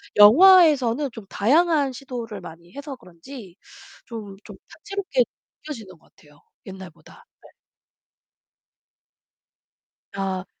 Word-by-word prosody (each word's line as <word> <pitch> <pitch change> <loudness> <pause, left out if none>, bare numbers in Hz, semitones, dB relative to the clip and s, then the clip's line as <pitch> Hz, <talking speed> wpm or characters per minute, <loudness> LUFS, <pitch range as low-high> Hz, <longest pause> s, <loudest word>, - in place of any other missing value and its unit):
영화에서는 290 - +6
좀 225 -3 -11
다양한 290 - +2
시도를 240 -5 -7
많이 170 +1 -13
해서 285 0 -7
그런지 185 +1 -13 0.5
좀 210 -5 -9
좀 - - -11
다채롭게 400 +5 -2 0.4
느껴지는 220 - -9
것 - - -29
같아요, 145 -1 -22 0.3
옛날보다. 190 -3 -13 0.2
예. - - -18 2.6
아. 190 -1 -3
230 Hz, 220 characters per minute, -23 LUFS, 190-285 Hz, 2.6 s, 영화에서는